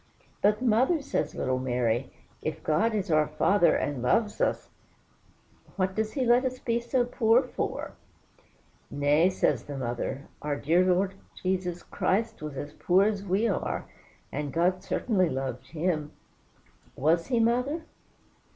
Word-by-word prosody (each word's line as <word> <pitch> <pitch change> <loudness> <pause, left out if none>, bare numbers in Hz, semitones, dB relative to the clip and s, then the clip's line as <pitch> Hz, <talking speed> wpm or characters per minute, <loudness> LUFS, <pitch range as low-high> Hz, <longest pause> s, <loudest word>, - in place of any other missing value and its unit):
'" - - -34
"But, 210 +3 +3
mother," 255 +8 +3
says 280 - -2
little 130 0 -1
Mary, 125 -1 0 0.3
"if - - -4
God 215 +9 +2
is 195 -5 -2
our 155 -1 +4
Father, 170 +3 +3
and 145 -4 -2
loves 210 - +1
us, - - 0 1.0
what 185 -1 0
does 215 +1 -2
he 265 -3 0
let 240 +2 +4
us 255 -1 -2
be 235 -2 -1
so 240 +1 0
poor 235 +1 +3
for?" 250 - -4 1.0
"Nay," 145 +5 +3
says 185 - +1
the 145 -1 -6
mother, 125 +3 -3
"our 150 -1 -1
dear 165 +6 +3
Lord 185 +1 +2 0.2
Jesus 180 -2 -2
Christ 220 +1 -1
was 150 -3 -6
as 145 +2 -6
poor 185 +4 +3
as 205 -1 0
we 200 +4 +1
are, 200 - -2 0.5
and 145 0 -3
God 180 +5 +1
certainly 185 -7 +1
loved 130 -2 -4
him." 155 -2 -2 0.8
"Was 165 +5 +2
he, 245 -3 +1
mother?" 250 +8 +1
185 Hz, 150 wpm, -28 LUFS, 150-225 Hz, 1.0 s, our